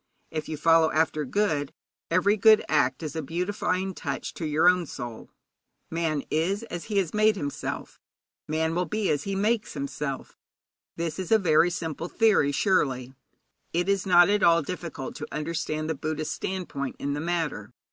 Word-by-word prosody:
If 155 -1 -4
you 155 - -3
follow 165 +1 +4
after 155 -1 +1
good, 150 -4 0 0.3
every 185 +5 +3
good 215 +1 +6
act 135 -2 +1
is 155 0 -5
a 160 - -1
beautifying 185 +4 -2
touch - - -4
to 165 - -4
your 155 +3 +3
own 180 -2 +4
soul. 120 -4 -7 0.6
Man 160 -3 -1
is 185 +8 0
as 175 -1 -5
he 210 -2 -2
has 185 -5 +1
made 215 0 +4
himself; 145 -7 -5 0.5
man 160 +1 0
will 180 +2 0
be 210 -4 0
as 145 -1 -1
he 195 -1 -2
makes 215 +1 0
himself. 140 -1 -5 0.6
This 165 -1 -3
is 185 +1 -5
a 220 - +7
very 170 -3 +4
simple 165 -2 -4
theory, 215 -11 +3
surely. 130 - +1 0.6
It 175 +2 +1
is 200 -1 +1
not 175 -1 +7
at 205 0 +2
all 170 -2 +5
difficult 170 -5 -6
to - - -6
understand 155 0 -3
the 160 - 0
Buddhist 155 +1 -3
standpoint 175 -8 -4
in 140 0 -2
the 145 - -3
matter. 160 -10 -2
165 Hz, 170 wpm, -26 LUFS, 150-185 Hz, 0.6 s, a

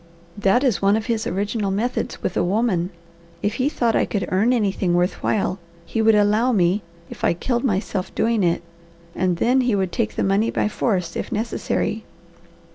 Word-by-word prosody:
That 205 +5 +2
is 255 -7 +1
one 200 +2 +4
of 220 - -4
his 230 -3 -1
original 200 +2 -1
methods 220 +6 -2
with - - -2
a - - +2
woman. 185 -2 +1 0.5
If 205 - +1
he 275 - +2
thought 235 -6 0
I - - +3
could 200 -3 -2
earn 200 +6 +3
anything 195 -6 +1
worth 180 +1 0
while, 195 -2 0 0.3
he 225 - -1
would 220 0 +5
allow 210 +4 +3
me, 190 -1 +2 0.3
if - - -10
I - - +3
killed 240 +7 -1
myself 195 -5 -1
doing 230 -2 +1
it; 170 -1 +1 0.5
and 180 -2 0
then 250 +8 +3
he 245 -4 +1
would 190 -2 0
take 225 +2 -2
the - - 0
money 200 +4 +2
by - - 0
force 190 -6 -1
if - - -4
necessary. 225 +2 -2
205 Hz, 190 wpm, -22 LUFS, 190-230 Hz, 0.5 s, would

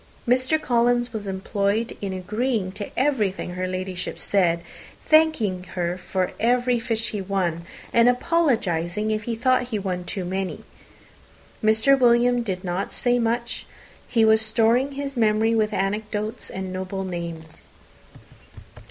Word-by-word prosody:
Mr. 255 +5 +3
Collins 240 -3 +1
was 210 -2 -5
employed 200 +3 -1
in 200 -2 -3
agreeing 210 +2 -1
to 200 +1 -6
everything 215 -10 0
her 185 +1 -3
Ladyship 185 0 -4
said, 175 -4 +2 0.4
thanking 310 -13 +3
her 175 -1 -1
for 185 0 -2
every 245 +1 +2
fish 230 -1 0
he 210 - -3
won, 180 -3 -2 0.3
and 235 +1 +6
apologizing 220 - +1
if 215 -1 -2
he 235 - -2
thought 255 +2 +2
he 225 -4 -2
won 185 -3 -3
too 185 +1 -3
many. 190 +1 -3 1.1
Sir 220 +6 +4
William 245 -1 +4
did 190 -5 -4
not 180 +1 -2
say 245 0 +1
much. 235 +1 -2 0.4
He 225 -2 +3
was 220 0 +5
storing 230 +5 +2
his 275 0 -5
memory 220 -1 +2
with 215 -1 +1
anecdotes 210 +3 -2
and 190 -1 -5
noble 190 +1 -4
names. 170 -3 -6
215 Hz, 135 wpm, -24 LUFS, 185-240 Hz, 1.1 s, and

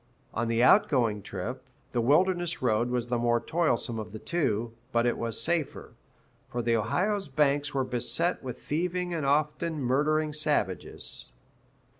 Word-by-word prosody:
On 115 +1 -1
the 115 +1 +2
out 200 +11 +6
going 115 -7 +1
trip, 105 +8 -5 0.3
the 120 - +1
Wilderness 175 +6 +2
Road 120 -1 +1
was 120 -1 -1
the 120 -1 +1
more 120 0 +2
toilsome 120 -5 0
of 110 -2 -7
the - - -5
two, 115 -6 -1 0.2
but 120 0 +2
it 120 - +2
was 115 -1 -2
safer, 160 +5 -1 0.6
for 120 0 -3
the 115 0 +2
Ohio's 180 - 0
banks 145 0 +1
were 135 - +2
beset 130 +8 -1
with 125 -3 -6
thieving 180 +3 -2
and 155 -4 -1
often 150 +3 +1
murdering 150 +4 +1
savages. 145 - -1
130 Hz, 155 wpm, -28 LUFS, 115-155 Hz, 0.6 s, out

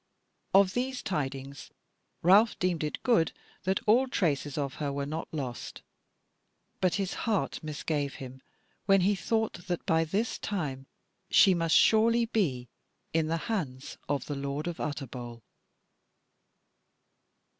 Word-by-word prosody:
Of 195 -1 +6
these 255 +1 -2
tidings 140 -5 -4 0.5
Ralph 205 +6 +5
deemed 180 -3 0
it 150 - -4
good 225 - +3 0.3
that 190 +1 +1
all 245 +5 +4
traces 150 - -1
of 140 -2 -2
her 145 -1 -1
were 140 0 -2
not 155 +3 -4
lost; 130 -6 -5 1.0
but 185 -2 +2
his 195 -2 -1 0.2
heart 210 -3 0
misgave 150 -2 -3
him 130 0 -9 0.5
when 195 -1 +5
he 195 +3 +3
thought 220 -3 -2
that 175 -2 -2
by 165 0 +2
this 205 +8 -1
time 140 -9 -3 0.4
she 190 - +6
must 165 -2 +2
surely 230 +2 +5
be 155 - -1 0.5
in 160 -1 +2
the 165 +1 0
hands 145 - -4
of 145 -1 -1
the 145 - -4
lord 140 +2 -3
of 175 -1 -4
Utterbol. 125 -5 -5
165 Hz, 135 wpm, -29 LUFS, 140-200 Hz, 1.0 s, Of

